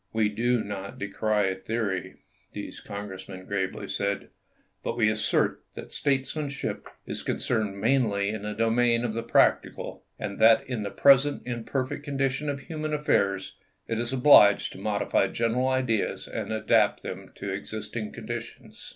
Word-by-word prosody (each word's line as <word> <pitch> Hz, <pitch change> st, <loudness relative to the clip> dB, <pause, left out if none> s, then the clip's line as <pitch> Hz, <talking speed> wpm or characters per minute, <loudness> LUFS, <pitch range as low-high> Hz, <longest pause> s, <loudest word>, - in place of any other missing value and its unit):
We 110 Hz, -1 st, +2 dB
do 120 Hz, +2 st, +1 dB
not 100 Hz, -1 st, -6 dB
decry 100 Hz, -1 st, 0 dB
theory," 100 Hz, 0 st, -3 dB, 0.4 s
these -, -, -7 dB
Congressmen 95 Hz, -2 st, -7 dB
gravely 95 Hz, -1 st, -3 dB
said; 100 Hz, 0 st, -2 dB, 0.5 s
"but 115 Hz, -, -3 dB
we 110 Hz, -3 st, +4 dB
assert 110 Hz, 0 st, +1 dB
that -, -, -8 dB
statesmanship 140 Hz, 0 st, -2 dB, 0.2 s
is -, -, -4 dB
concerned 105 Hz, -4 st, -1 dB
mainly 110 Hz, -4 st, +2 dB
in 110 Hz, -1 st, -4 dB
the 105 Hz, 0 st, -4 dB
domain 115 Hz, +2 st, +2 dB
of 110 Hz, -, -2 dB
the 115 Hz, -, -2 dB
practical, 115 Hz, -, +1 dB
and 100 Hz, -1 st, -5 dB
that 110 Hz, +1 st, +6 dB
in 125 Hz, -4 st, -3 dB
the 100 Hz, -, -3 dB
present 140 Hz, +4 st, +4 dB
imperfect 130 Hz, +3 st, -3 dB
condition 140 Hz, 0 st, -1 dB
of 140 Hz, -1 st, -3 dB
human 155 Hz, -1 st, -3 dB
affairs 100 Hz, -10 st, +1 dB, 0.3 s
it 115 Hz, -1 st, -1 dB
is 120 Hz, +1 st, +1 dB
obliged 125 Hz, -6 st, +6 dB
to -, -, -10 dB
modify -, -, +1 dB
general 120 Hz, +3 st, 0 dB
ideas 130 Hz, -5 st, 0 dB
and -, -, -4 dB
adapt 110 Hz, 0 st, +2 dB
them -, -, -7 dB
to 100 Hz, -, -5 dB
existing 105 Hz, +2 st, -5 dB
conditions." -, -, -8 dB
115 Hz, 145 wpm, -27 LUFS, 100-130 Hz, 0.5 s, that